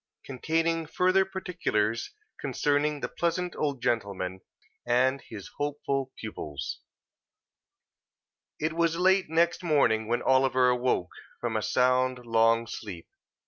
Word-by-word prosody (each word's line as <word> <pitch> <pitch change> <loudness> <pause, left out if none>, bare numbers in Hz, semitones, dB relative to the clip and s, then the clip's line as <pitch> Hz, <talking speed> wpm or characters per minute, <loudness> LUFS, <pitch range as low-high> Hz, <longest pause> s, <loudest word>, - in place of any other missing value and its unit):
CONTAINING 165 +4 -1
FURTHER 185 +4 +3
PARTICULARS 190 - -2 0.2
CONCERNING 145 0 0
THE - - -1
PLEASANT 175 +1 -2
OLD 140 -4 -2
GENTLEMAN, 95 -5 -1 0.4
AND 130 +3 +2
HIS 100 -4 -9
HOPEFUL 140 -2 -2
PUPILS 75 -10 -6 1.8
It 155 +1 -1
was 165 0 +1
late 190 0 +3
next 170 +3 +2
morning 125 -9 +2
when 120 +1 0
Oliver 130 -1 +4
awoke, 125 -7 0 0.3
from 120 -2 -2
a 110 - +1
sound, 125 +1 +1
long 115 0 +3
sleep. 100 -7 -8
130 Hz, 110 wpm, -28 LUFS, 115-165 Hz, 1.8 s, Oliver